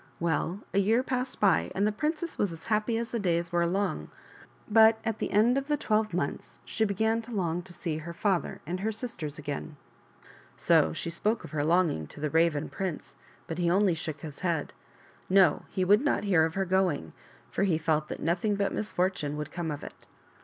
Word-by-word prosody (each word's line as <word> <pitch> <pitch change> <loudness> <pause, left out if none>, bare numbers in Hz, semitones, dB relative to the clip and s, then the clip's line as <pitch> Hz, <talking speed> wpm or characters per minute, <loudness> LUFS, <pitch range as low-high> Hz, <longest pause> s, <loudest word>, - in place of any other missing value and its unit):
Well, 170 +3 -1
a 200 - +3
year 225 +6 +3
passed 255 0 -3
by, 195 -5 +3
and 200 - +2
the 210 - +2
princess 310 +8 -2
was 200 - +1
as 165 - -10
happy 215 +1 +1
as 230 0 -3
the 235 - -1
days 170 -3 0
were 170 0 +2
long; 195 +3 -1 0.6
but 220 +1 +6
at 225 -1 -1
the - - -1
end 235 +6 +4
of 275 - -8
the 295 -1 +1
twelve 215 -6 +1
months 170 -5 -3
she 220 - 0
began 220 +3 +1
to 235 +2 -11
long 175 -5 -1
to 185 +1 -11
see 165 -3 -3
her 165 +2 -6
father 185 +1 -1
and 175 +4 -3
her 215 +3 -1
sisters 195 - -5
again. 145 +1 -5 0.8
So 80 - +4
she 165 - -4
spoke 215 +6 -1
of - - -10
her 150 -2 -1
longing 160 - +2
to - - -10
the 150 0 -2
Raven 160 -2 +2
prince, 185 -5 -5 0.3
but 165 +1 -5
he 175 -1 +2
only 190 +1 +3
shook 155 -2 -4
his 150 -3 -8
head. 170 -5 -1 0.6
No; 185 -5 +4
he 185 - -1
would 205 +4 +5
not 290 -5 +1
hear 180 -6 +4
of 160 - -4
her 195 0 0
going, 180 - 0 0.4
for - - -2
he 190 -5 +3
felt 155 -1 0
that - - -6
nothing 175 +6 +1
but 200 0 0
misfortune 180 -7 -1
would 150 -1 -5
come 170 -1 -3
of 145 -1 -5
it. - - -11
185 Hz, 210 wpm, -29 LUFS, 160-215 Hz, 0.8 s, but